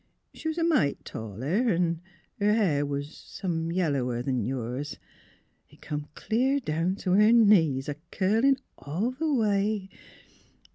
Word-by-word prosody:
She - - -7
was 320 +1 -2
a 335 - +1
mite 300 - +1
taller, 130 - -2
an' 170 -3 +1 0.4
her 210 +1 +3
hair 160 -10 +2
was 145 +1 -4
— - - -15
some 165 -4 -2
yellower 140 -9 0
'n 130 -3 0
yours. 130 +3 -4 0.7
It - - -19
come 150 0 -4
clear 260 +5 +1
down 170 - -1
t' 190 -2 -3
her 210 +4 +6
knees, 170 - +4
a 145 -1 -4
curlin' 225 +8 +3 0.2
all 180 - -2
the 305 +4 -2
way. 210 -4 +1
180 Hz, 145 wpm, -27 LUFS, 145-220 Hz, 0.7 s, her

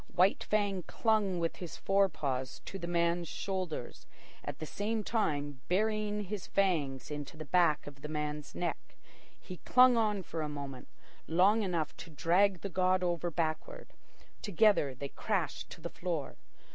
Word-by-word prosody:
White 185 +3 +4
Fang 205 -3 +1
clung 215 -5 +1
with 170 -1 -1
his 175 -3 -7
fore 195 0 +3
paws 130 -5 -3
to 195 - -6
the 170 - -4
man's 170 0 +1
shoulders, 185 -10 -4 0.4
at - - -5
the 155 - -5
same 215 +6 -2
time 145 - -1
burying 210 +2 +1
his 200 0 -5
fangs 150 -10 0
into 150 +2 -6
the 155 - -6
back 165 -1 +3
of 140 -1 -10
the 150 - -5
man's 150 -1 -4
neck. - - -4 0.4
He 180 - -9
clung 250 +3 +6
on 210 -4 +1
for 165 -1 -4
a 150 - -2
moment, 140 -3 -6 0.4
long 190 +7 +4
enough 170 -6 -1
to - - -9
drag 175 +4 +3
the - - -3
god 185 +1 +2
over 175 -1 0
backward. 165 - -3 0.5
Together 200 - +3
they 140 +2 -5
crashed 185 -6 -2
to 170 - -10
the 170 - -4
floor. 170 -5 -3
175 Hz, 160 wpm, -32 LUFS, 150-200 Hz, 0.5 s, clung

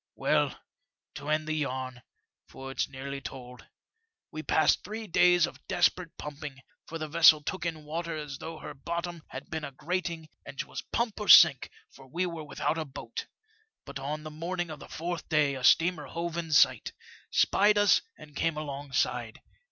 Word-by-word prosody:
Well, - - +1 0.5
to 145 +1 -7
end 155 0 +1
the 155 - -1
yam, 130 -4 -3 0.5
for 135 0 -9
it's - - -1
nearly 140 +1 -6
told, 125 -1 -9 0.6
we 155 - -5
passed 155 0 +3
three 220 +1 -6
days 175 -2 +5
of - - -11
desperate 180 -3 +1
pumping, 145 -2 -7 0.3
for 165 - -5
the 155 -1 -4
vessel 155 -1 +6
took 185 +2 -3
in 160 -2 -5
water 165 +2 -4
as 150 -3 -6
though 165 0 -7
her 150 - -8
bottom 170 +3 -4
had 130 - -9
been 160 -1 -3
a 140 - -5
grating, 170 +2 -3 0.2
and 135 0 -10
'twas - - -4
pump 235 -3 -1
or 210 - -4
sink, 145 -6 +8 0.2
for 135 -1 -16
we 175 +7 -1
were 170 -3 -5
without 155 +2 -2
a 160 - -2
boat. 135 - -7 0.6
But - - -7
on 150 +3 -4
the 155 - -7
morning 170 +2 -3
of 150 - -8
the - - -12
fourth 170 0 -5
day 150 -3 +3
a 130 -1 -6
steamer 165 +1 +4
hove 170 +3 -4
in 165 -2 -4
sight, 150 - +4 0.4
spied 210 +1 +4
us 205 -1 +5 0.2
and 150 -1 -14
came 165 +1 0
alongside. 135 -5 -2
155 Hz, 180 wpm, -29 LUFS, 140-170 Hz, 0.6 s, sink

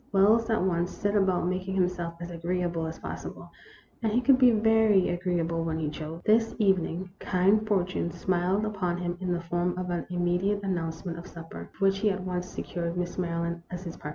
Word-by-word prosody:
Wells 215 +4 +4
at 220 -4 +2
once 175 -1 +1
set 205 +1 -2
about 190 -3 +2
making 185 +1 -2
himself 180 -2 0
as 175 0 -6
agree 175 +2 -2
able 170 -2 -1
as 160 - -6
possible, - - -7 0.5
and 220 -2 +1
he 235 - +3
could 260 +1 +5
be 255 -2 +8
very 220 -3 +4
agreeable 175 -2 -1
when 160 -1 -1
he 155 -2 -2
chose. 160 +2 -7
This 225 +1 +3
evening 185 -3 +1
kind 200 +4 +2
fortune 185 -4 0
smiled 185 +4 0
upon 185 -5 -1
him 175 -1 -2
in 185 -1 -1
the 175 -1 0
form 175 +1 -1
of 180 -1 -3
an 175 -1 -2
immediate 180 +3 0
announce 165 -3 -2
ment 170 -1 -4
of 175 - -10
supper, 165 - -9
for 195 - 0
which 195 0 +3
he 215 +1 +3
at 190 -2 -2
once 180 0 -3
secured 170 0 -4
Miss 180 +1 -3
Maryland 170 -1 -2
as 180 0 -6
his 170 -3 -6
partner. 150 - -7
180 Hz, 210 wpm, -28 LUFS, 170-195 Hz, 0.5 s, be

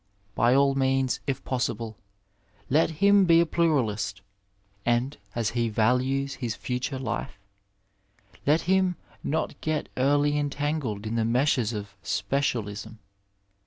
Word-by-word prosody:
By 120 +5 +3
all 140 0 +4
means, 135 -1 +1
if 135 -1 -2
possible, 115 -3 -2 0.8
let 155 +4 +4
him 200 +5 +4
be 165 -1 +6
a 170 - +4
pluralist, 140 -15 0 0.6
and 120 +5 +1
— 100 - -31
as 115 -3 0
he 120 -1 0
values 125 +5 +1
his 115 -3 -2
future 125 +2 -3
life 115 -6 -4 0.5
— 100 +1 -28
^let 155 +3 +4
him 185 +1 +2 0.3
not 155 -1 -2
get 155 -1 -2
early 145 +2 +3
entangled 145 -7 -2
in 110 +2 -2
the 115 - +2
meshes 120 0 +2
of 105 -2 -5
specialism. 110 - -2
130 Hz, 130 wpm, -26 LUFS, 115-145 Hz, 0.8 s, be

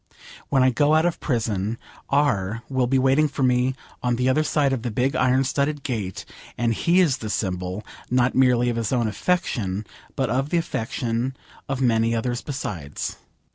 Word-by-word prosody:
When 135 -2 +4
I 130 - +4
go 145 +5 +3
out 160 +1 +4
of 175 - 0
prison, 110 - -1 0.3
R 115 -6 +1
will 130 -2 +1
be 135 +2 +2
waiting 135 +4 +4
for 140 -1 -3
me 125 +1 +2 0.3
on 120 -1 +1
the 125 +2 +1
other 155 +4 +3
side 145 -3 +1
of 130 - -2
the 120 - -2
big 125 +5 0
iron 130 +1 +3
studded 140 +2 -1
gate, 105 -8 -3 0.3
and 115 0 +1
he 170 +10 +2
is 160 -8 +3
the 110 - -6
symbol, 95 0 -2 0.2
not 125 0 +2
merely 125 -2 +4
of 115 - -3
his 115 -2 -1
own 120 -3 +1
affection, 110 - -1 0.3
but 130 -5 0
of 135 +3 0
the 170 - +1
affection 125 -4 -2 0.3
of 135 -1 -2
many 115 -2 +2
others 120 +1 -1
besides. 95 - -5
125 Hz, 180 wpm, -24 LUFS, 115-135 Hz, 0.3 s, When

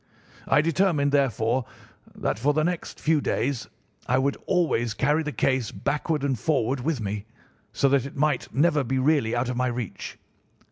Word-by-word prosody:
I - - +4
determined, 160 -3 +2
therefore, 130 -3 +1 0.5
that - - -2
for 145 +5 +2
the 155 - +2
next 175 +1 -3
few 155 -1 +2
days 135 -2 -1 0.4
I 125 - +2
would 140 +1 +1
always 135 -11 +1
carry 150 +5 +2
the 150 -1 -3
case 130 -1 0
backward 150 +1 -2
and 135 -5 0
forward 135 -1 0
with 145 +1 -1
me, 105 -1 -4 0.5
so 140 - +2
that 140 -1 +2
it - - -12
might 145 -2 0
never 150 0 +2
be 130 +2 -1
really 130 -4 +2
out 120 +1 0
of 125 - -3
my 125 0 +1
reach. 120 -3 -5
140 Hz, 175 wpm, -25 LUFS, 125-150 Hz, 0.5 s, I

